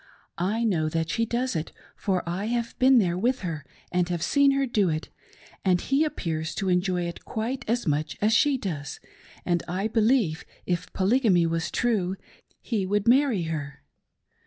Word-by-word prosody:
I 210 +6 0
know 165 -8 +1
that 160 +1 -1
she 230 0 0
does 245 0 -1
it, 160 0 -3 0.2
for 185 -3 -1
I 180 +4 -2
have 235 +1 -1
been 260 0 +6
there 180 -5 +2
with 250 +5 +1
her, 165 -5 -4 0.3
and 180 -1 +1
have 170 -2 -2
seen 280 -1 +4
her 275 0 +2
do 210 -7 +1
it; 155 0 -3 0.5
and 185 -2 +3
he 275 - +1
appears 165 - -3
to 195 -2 -1
enjoy 180 0 +1
it 170 0 -6
quite 235 +4 -3
as 240 +1 0
much 150 0 -1
as 215 +2 +2
she 285 +3 +4
does, 155 - -5 0.5
and, 175 -2 +1
I 185 +4 -1
believe, 220 -7 +2 0.2
if 175 -2 -2
Polygamy 195 -3 +3
was 165 0 -1
true 200 -6 0 0.5
he 220 -5 -1
would 205 +2 0
marry 250 -6 +4
her." 150 -3 -5
190 Hz, 175 wpm, -26 LUFS, 170-235 Hz, 0.5 s, been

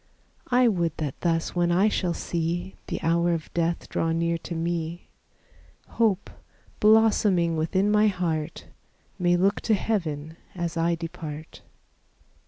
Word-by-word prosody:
I 250 0 +4
would 170 -7 0
that 145 -4 -4
thus 165 -1 0
when 175 0 +2
I 185 +5 +4
shall 180 -5 0
see 175 +2 -2
The - - -3
hour 170 +1 +2
of 160 - -7
death 170 0 -1
draw 165 - -1
near 170 0 0
to 170 - -6
me, 170 0 -3 0.8
Hope, 215 -5 +1 0.5
blossoming 210 -6 +4
within 190 +6 +1
my 210 +1 +4
heart, 165 -5 -2 0.5
May 175 -1 +3
look 195 +3 +2
to 220 - +2
heaven 160 -7 -2 0.2
as 175 -1 -3
I 170 +1 +1
depart. 160 -2 -7
170 Hz, 135 wpm, -26 LUFS, 165-190 Hz, 0.8 s, I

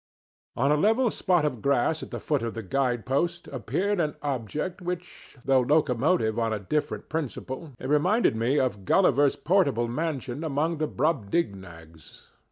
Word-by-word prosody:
On 140 +4 +2
a - - +5
level 225 - +3
spot 175 -5 +1
of 125 -7 -2
grass 140 +3 +1
at - - -7
the - - -5
foot 145 -3 0
of 115 0 -4
the 115 - -5
guide 125 +2 -1
post 170 +7 -1
appeared 200 0 -1
an 155 -3 0
object 145 - -3
which, 180 -4 -7
though 135 -1 +4
locomotive 130 -2 +2
on 115 -1 0
a 110 - 0
different 145 +10 -2
principle, 145 -1 -5
reminded 150 - +2
me 120 +6 +1
of 120 -7 -1
Gulliver's 145 - +3
portable 150 -9 +2
mansion 140 0 -3
among 160 +2 -1
the 155 - 0
Brobdignags. 100 - -3
140 Hz, 155 wpm, -26 LUFS, 120-165 Hz, -, a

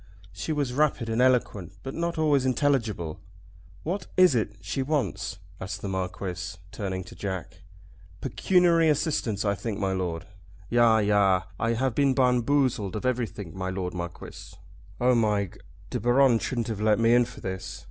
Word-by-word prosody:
She 100 +11 -4
was 145 -5 -1
rapid 135 -5 +1
and 115 +2 +1
eloquent, 115 -8 +1
but 135 - -5
not 170 0 -2
always 150 -4 +3
intelligible. 120 - 0 0.6
"What 185 +5 -3
is 185 -5 +7
it 110 -3 -1
she 135 - -3
wants?" 115 -9 -1 0.2
asked 95 - -6
the - - -2
Marquis, 95 0 -4
turning 95 -3 -4
to 90 - -12
Jack. 95 -4 -5 0.6
"Pecuniary 170 -3 +3
assistance, 135 - 0
I 100 - +2
think, 100 +1 -4
my 95 -2 0
Lord." 90 -3 -3 0.5
"Yah, 120 -2 +5
yah. 100 -3 +3 0.2
I 115 0 +1
have 130 +1 0
been 140 -1 +2
bamboozled 125 -4 +2
of 105 - -4
everything, 115 -8 -2
my 95 0 -3
Lord 95 -1 -3
Marquis." 85 -1 -8 0.4
"Oh, 125 +1 +4
my 105 -4 +2
G, 90 - -15 0.3
De - - -1
Baron 120 +1 +4
shouldn't 120 -2 -2
have 105 -2 -3
let 105 -1 +3
me 115 0 +4
in 120 0 +5
for - - -11
this. 95 0 -5
115 Hz, 165 wpm, -27 LUFS, 95-130 Hz, 0.6 s, is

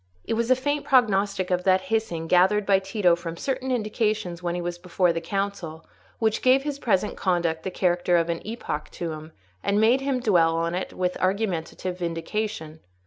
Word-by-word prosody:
It - - -2
was 230 +1 0
a 255 - +6
faint 290 +3 -1
prognostic 200 -7 +2
of 180 0 +1
that 190 0 +4
hissing, 175 -8 -1
gathered 190 +5 +3
by 195 -1 +4
Tito 190 -2 +2
from 170 -1 -7
certain 265 +3 -3
indications 215 -6 -1
when 175 -1 -2
he 175 - -2
was 175 0 -4
before 180 -1 +1
the 165 - -3
council, 175 -3 -4 0.3
which 220 -1 0
gave 260 +1 +4
his 290 -1 -4
present 210 -4 0
conduct 170 -3 0
the 190 - -3
character 175 -1 +1
of 165 -1 +1
an 170 -1 -2
epoch 215 -8 -5
to 170 -2 -4
him, 155 +1 -8 0.3
and 200 - +1
made 235 +5 +4
him 270 -2 0
dwell 170 -8 +3
on 165 +1 -1
it 180 - -3
with 180 0 -2
argumentative 185 -2 -2
vindication. 165 -1 -3
185 Hz, 190 wpm, -25 LUFS, 170-220 Hz, 0.3 s, a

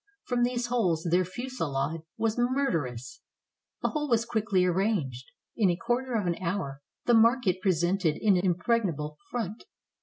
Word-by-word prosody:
From 245 -1 -1
these 245 0 +1
holes 185 -10 0
their 180 +1 +4
fusillade 165 - -3 0.2
was 225 -1 0
murderous. 165 - -1 0.6
The - - +2
whole 295 -2 -2
was 230 -1 +2
quickly 215 -5 +1
arranged. 175 - 0 0.3
In 210 -5 +3
a 175 - +2
quarter 245 +6 -1
of 210 -4 0
an 175 0 -1
hour 165 -6 -3 0.2
the 240 - +4
market 225 -5 +4
pre 190 - +3
sented 175 -1 +1
an 200 -3 +6
impregnable 175 - 0
front. 225 -3 -4
195 Hz, 150 wpm, -28 LUFS, 165-240 Hz, 0.6 s, an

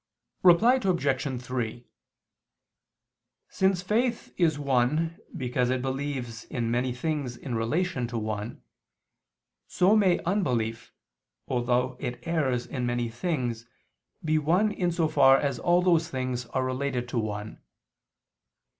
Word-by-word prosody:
Reply 220 +9 +6
Obj. 140 - 0
3: 120 -2 -4 1.6
Since 190 -1 +1
faith 230 +5 0
is 160 -5 +2
one 145 +4 +1 0.2
because 125 -1 0
it 130 -1 0
believes 130 -4 -3
in 115 -2 -2
many 125 +2 0
things 130 -1 -3
in 125 - -6
relation 125 +4 -1
to 115 0 -4
one, 110 +1 -4 1.0
so 190 +4 +3
may 195 -5 +4
unbelief, 125 - -1 0.6
although 125 0 0
it 125 - -4
errs 135 -8 0
in 125 -3 -3
many 120 -1 -1
things, 120 -4 -3 0.6
be 155 0 +2
one 180 +8 +2
in 180 -3 -1
so 165 -1 +1
far 135 -3 +6
as 140 -4 -1
all 175 +1 +3
those 170 -2 +3
things 130 -3 -3
are 130 +2 -1
related 130 -1 -2
to 120 - -1
one. 105 -1 -5
130 Hz, 125 wpm, -27 LUFS, 120-170 Hz, 1.6 s, Reply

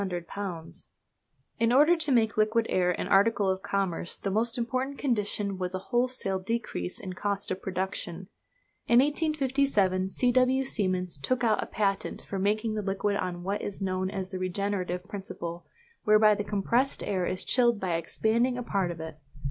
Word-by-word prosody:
In 230 0 +3
order 300 +7 +6
to 315 -4 +1
make 225 -4 +3
liquid 220 +2 +2
air 180 -1 +2
an 180 - -1
article 200 0 +4
of 190 0 -3
commerce 195 -3 -2
the 195 - -3
most 230 +4 +1
important 255 +3 -2
condition 205 -6 -1
was 180 0 -2
a 185 - -8
wholesale 240 -6 +1
decrease 190 - -3
in 185 - -6
cost 200 +1 -2
of 185 - -3
production. 185 -1 -3 0.6
In 235 - +5
1857 270 - +2
C. 245 +5 +1
W. 255 +2 +3
Siemens 185 - -1
took 250 - 0
out 225 -2 +3
a - - -4
patent 195 -2 -1
for 195 - -4
making 215 +3 +1
the 215 - -1
liquid 200 +1 -1
on 175 -2 -3
what 200 +3 -2
is 205 - -5
known 185 -1 -1
as 190 -1 -5
the 185 - -4
regenerative 185 -1 -2
principle, 175 -4 -7 0.4
whereby 215 0 +6
the 205 0 -2
compressed 215 +6 0
air 185 -3 -1
is 185 - -2
chilled 240 -3 +3
by 185 -3 -1
expanding 225 +9 +1
a 245 - -3
part 195 -5 0
of 170 -1 -6
it. 160 -1 -7
205 Hz, 170 wpm, -28 LUFS, 185-235 Hz, 0.6 s, order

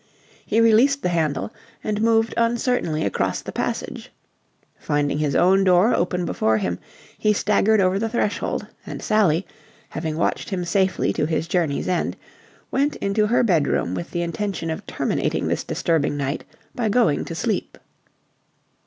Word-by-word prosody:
He 225 - +1
released 235 +5 +4
the - - +1
handle 160 +4 -1 0.3
and 210 0 -1
moved 225 0 +3
uncertainly 230 -8 0
across 100 - -1
the - - -6
passage. - - -4 0.7
Finding 145 -1 0
his 150 -2 0
own 190 +2 +4
door 185 +4 +4
open 180 0 0
before 110 -7 +1
him, 90 -4 -2 0.4
he 215 - +3
staggered 210 +1 +2
over 190 0 +2
the 225 +1 -1
threshold; 215 -3 -1 0.2
and - - -7
Sally, 195 -5 +2 0.4
having 160 -1 -4
watched 170 - -1
him 180 -3 -2
safely 190 0 +1
to 150 - 0
his 160 0 -1
journey's 165 -5 0
end, 180 - -1 0.5
went 285 +2 +1
into 210 +2 0
her 240 +3 +3
bedroom 160 - +1
with 90 -2 -4
the 175 - -2
intention 170 -1 -3
of 175 +6 -6
terminating - - -1
this - - -1
disturbing 160 -4 0
night 140 0 -3 0.3
by 230 -3 -1
going 210 -10 +2
to 165 - -6
sleep. 215 +6 -2
185 Hz, 155 wpm, -22 LUFS, 160-220 Hz, 0.7 s, released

